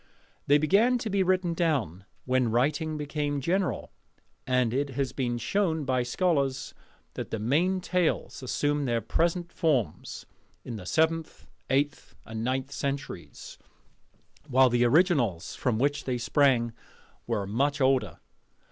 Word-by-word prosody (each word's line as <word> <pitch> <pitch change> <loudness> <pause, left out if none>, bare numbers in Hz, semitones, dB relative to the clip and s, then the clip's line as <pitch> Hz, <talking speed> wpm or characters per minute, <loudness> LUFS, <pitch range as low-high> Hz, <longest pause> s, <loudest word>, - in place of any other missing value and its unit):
They 145 - +6
began 200 +12 +3
to 225 -3 -4
be 200 0 +2
written 185 -2 +1
down 135 - -1 0.2
when 130 -2 +2
writing 150 +7 0
became 145 -1 -2
general: 180 +7 -1 0.6
and 125 -3 +2
it 140 +2 0
has 135 -2 -1
been 120 -3 -2
shown 160 - 0
by 130 -1 +1
scholars 135 0 0 0.4
that - - -5
the - - -2
main 165 - +1
tales 180 -5 -1
assumed 145 +2 0
their 120 -1 +1
present 170 - -1
forms 135 - -1 0.4
in 120 - -5
the 95 -4 -8
seventh, 160 - 0 0.2
eighth, 145 +2 -1
and 110 0 -5
ninth 130 +2 -1
centuries; 140 0 -5 0.9
while 130 -2 +4
the 120 0 +3
originals 120 - +2
from 120 -4 -1
which 145 +4 0
they 125 -2 -1
sprang 120 -1 +2 0.5
were 110 -4 -1
much 140 +8 0
older. 130 -1 +2
140 Hz, 135 wpm, -28 LUFS, 120-160 Hz, 0.9 s, They